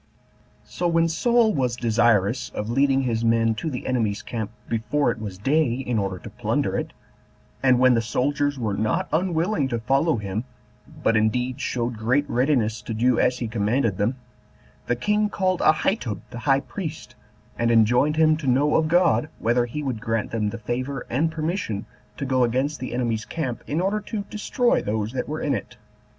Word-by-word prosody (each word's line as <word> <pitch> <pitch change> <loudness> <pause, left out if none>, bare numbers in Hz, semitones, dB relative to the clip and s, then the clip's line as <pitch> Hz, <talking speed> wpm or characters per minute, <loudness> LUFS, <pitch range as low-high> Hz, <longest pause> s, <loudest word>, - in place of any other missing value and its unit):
5. - - -26
So 175 - -1
when 165 -1 +3
Saul 230 +7 +3
was 125 -4 0
desirous 115 -1 +2
of 105 +2 -3
leading 135 +1 +3
his 115 -2 -1
men 115 0 +3
to 135 +9 -4
the 125 -4 -5
enemy's 110 -5 -1
camp 110 -4 -4 0.2
before 120 +4 0
it 115 - -6
was 100 -4 -6
day, 135 +3 +2
in 125 -3 -1
order 95 -2 -2
to - - -10
plunder - - -1
it, - - -2 0.7
and 130 -2 +4
when 130 0 +5
the 115 - +2
soldiers 145 +4 0
were 110 -5 -1
not 110 +2 0
unwilling 170 -2 +1
to 120 -3 -2
follow 135 +6 +2
him, 105 +1 -3 0.6
but 115 - +3
indeed 125 +5 0
showed 120 -2 -2
great 130 +6 +1
readiness 120 -4 +1
to 110 +1 -5
do 120 +2 +2
as 125 0 +2
he 120 - -3
commanded 110 0 0
them, 110 +6 +1 0.7
the 120 - +1
king 210 - +1
called 185 -3 0
Ahitub 155 - +1
the 120 - -6
high 135 0 +4
priest, 155 +4 -7 0.4
and 115 0 0
enjoined 120 +6 +4
him 155 0 +4
to 150 -4 -5
know 140 +4 +3
of 160 - +2
God 170 -2 +3
whether 120 +1 +1
he 150 +5 -5
would 125 -6 -3
grant 115 -2 -2
them 110 -2 0
the 115 - -5
favor 125 +5 -4
and 155 +7 +1
permission 155 - -3 0.3
to 140 - -3
go 130 -1 +2
against 130 +5 0
the 130 - -5
enemy's 115 -3 -1
camp, 130 -8 -4
in 150 +4 -1
order 195 +4 0
to 210 0 -5
destroy 240 +3 +1
those 105 +1 -2
that 130 +2 -3
were 155 +1 -3
in 145 - 0
it. - - -5
125 Hz, 190 wpm, -24 LUFS, 115-150 Hz, 0.7 s, when